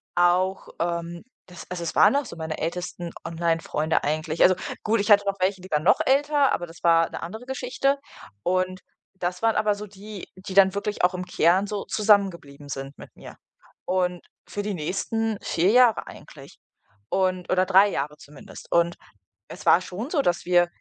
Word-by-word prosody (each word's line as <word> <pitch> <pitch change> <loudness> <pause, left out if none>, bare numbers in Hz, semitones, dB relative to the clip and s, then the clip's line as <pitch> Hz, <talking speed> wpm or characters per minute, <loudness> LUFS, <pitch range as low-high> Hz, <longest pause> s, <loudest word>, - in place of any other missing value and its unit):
auch, 180 +2 +2
ähm 170 +1 -3 0.3
das 175 - -11
also, 175 -1 -4
es 165 - -4
waren - - +6
auch 285 - -1
so - - -9
meine 160 -1 -5
ältesten 175 +1 -4 0.2
Online-Freunde 165 -1 -1
eigentlich. 155 +2 0
Also, 185 - +6 0.3
gut, 220 0 +1
ich 205 - -1
hatte 205 -1 +7
noch 200 0 -1
welche, 190 0 0
die 185 - -12
waren 150 0 +1
noch - - +4
älter, 285 +1 +3
aber 175 - -2
das 165 - -15
war 165 -1 +4
'ne - - -7
andere 220 +8 -7
Geschichte. 265 +2 -1 0.5
Und 185 +1 -1 0.3
das 180 -1 -4
waren 225 -1 +2
aber 215 -1 +2
so 210 +1 -8
die, 205 0 -10
die 185 0 -9
dann 195 0 +5
wirklich 200 -2 0
auch 180 - +1
im 180 - -4
Kern 180 +2 +2
so 205 -1 -4
zusammengeblieben 190 -9 +1
sind 135 0 -7
mit - - -13
mir - - -12 0.5
und 180 -1 0 0.3
für 205 - -4
die 210 - -3
nächsten 200 +6 -2
4 175 +4 +1
Jahre 245 -1 +4
eigentlich - - -13 0.5
und 185 -1 0
oder 185 0 +3
3 195 +2 +6
Jahre 150 -2 -3
zumindest. 195 +8 -13
Und 170 0 +2 0.5
es - - -10
war 170 - +6
schon 205 +9 -6
so, 310 -4 +1
dass 175 -8 0
wir 175 -1 +4
185 Hz, 185 wpm, -24 LUFS, 170-205 Hz, 0.5 s, hatte